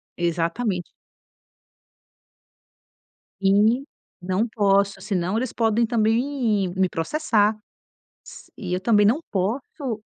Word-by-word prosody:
exatamente. 175 Hz, +3 st, -1 dB, 2.5 s
E 210 Hz, +7 st, +3 dB, 0.4 s
não 190 Hz, +6 st, 0 dB
posso, 200 Hz, -2 st, +1 dB
se 195 Hz, +1 st, -5 dB
não 180 Hz, +4 st, 0 dB
eles 255 Hz, 0 st, -2 dB
podem 230 Hz, 0 st, +2 dB
também 225 Hz, -2 st, +1 dB
me 185 Hz, -1 st, +2 dB
processar 215 Hz, -, +1 dB, 0.7 s
s -, -, -13 dB
e 180 Hz, -3 st, -4 dB
eu 180 Hz, -, 0 dB
também 210 Hz, 0 st, +3 dB
não 245 Hz, +9 st, +3 dB
posso, 225 Hz, -, -3 dB
210 Hz, 100 wpm, -23 LUFS, 190-235 Hz, 2.5 s, E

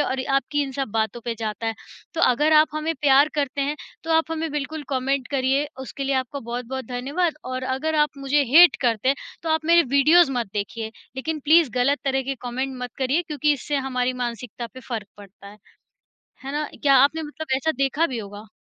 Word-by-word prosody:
और 265 Hz, -2 st, 0 dB
आपकी 290 Hz, +2 st, +1 dB
इन 275 Hz, -1 st, -5 dB
सब 270 Hz, -1 st, -3 dB
बातों 225 Hz, +1 st, -1 dB
पे 235 Hz, -, -2 dB
जाता 220 Hz, 0 st, -4 dB
है। 225 Hz, -, -1 dB, 0.4 s
तो 325 Hz, -, -2 dB
अगर 295 Hz, +5 st, +2 dB
आप 310 Hz, 0 st, +6 dB
हमें 310 Hz, +1 st, -1 dB
प्यार 280 Hz, 0 st, +5 dB
करते 285 Hz, -2 st, -1 dB
हैं, 285 Hz, +2 st, -1 dB, 0.3 s
तो 330 Hz, -, -4 dB
आप 320 Hz, 0 st, +2 dB
हमें 325 Hz, 0 st, -3 dB
बिल्कुल 295 Hz, +1 st, -4 dB
कॉमेंट 270 Hz, 0 st, -1 dB
करिए, 275 Hz, +1 st, +1 dB
उसके 270 Hz, +2 st, -6 dB
लिए 275 Hz, 0 st, 0 dB
आपको 260 Hz, +2 st, -2 dB
बहुत-बहुत 250 Hz, +2 st, -5 dB
धन्यवाद 280 Hz, +8 st, -1 dB
और 255 Hz, 0 st, -4 dB
अगर 315 Hz, +4 st, -2 dB
आप 300 Hz, -1 st, +3 dB
मुझे 275 Hz, +1 st, +2 dB
हेट 350 Hz, +1 st, +9 dB
करते 235 Hz, -1 st, +1 dB
हैं, 275 Hz, -, +4 dB, 0.3 s
तो 330 Hz, -, -4 dB
आप 315 Hz, 0 st, +1 dB
मेरे 340 Hz, +1 st, +6 dB
वीडियोज़ 310 Hz, +3 st, +6 dB
मत 240 Hz, -3 st, -1 dB
देखिए, 220 Hz, +2 st, -4 dB, 0.3 s
लेकिन 310 Hz, +4 st, -3 dB
प्लीज़ 315 Hz, -2 st, +5 dB
गलत 265 Hz, +3 st, +2 dB
तरह 270 Hz, -1 st, +1 dB
के 270 Hz, +1 st, -3 dB
कॉमेंट 260 Hz, +2 st, -3 dB
मत 250 Hz, -, -4 dB
करिए, 270 Hz, +6 st, +1 dB
क्योंकि 300 Hz, -2 st, 0 dB
इससे 290 Hz, +1 st, -2 dB
हमारी 250 Hz, -1 st, 0 dB
मानसिकता 235 Hz, 0 st, -6 dB
पे 260 Hz, -, -9 dB
फ़र्क 230 Hz, -4 st, -5 dB
पड़ता 200 Hz, 0 st, -14 dB
है। 205 Hz, +1 st, -14 dB, 0.9 s
है 270 Hz, -, -5 dB
ना? 295 Hz, +1 st, -2 dB
क्या 275 Hz, -2 st, +5 dB
आपने 285 Hz, +5 st, +4 dB
मतलब 310 Hz, +1 st, -7 dB
ऐसा 295 Hz, +4 st, 0 dB
देखा 275 Hz, +4 st, +1 dB
भी 255 Hz, -, -4 dB
होगा? 205 Hz, +1 st, -9 dB
275 Hz, 205 wpm, -23 LUFS, 250-300 Hz, 0.9 s, हेट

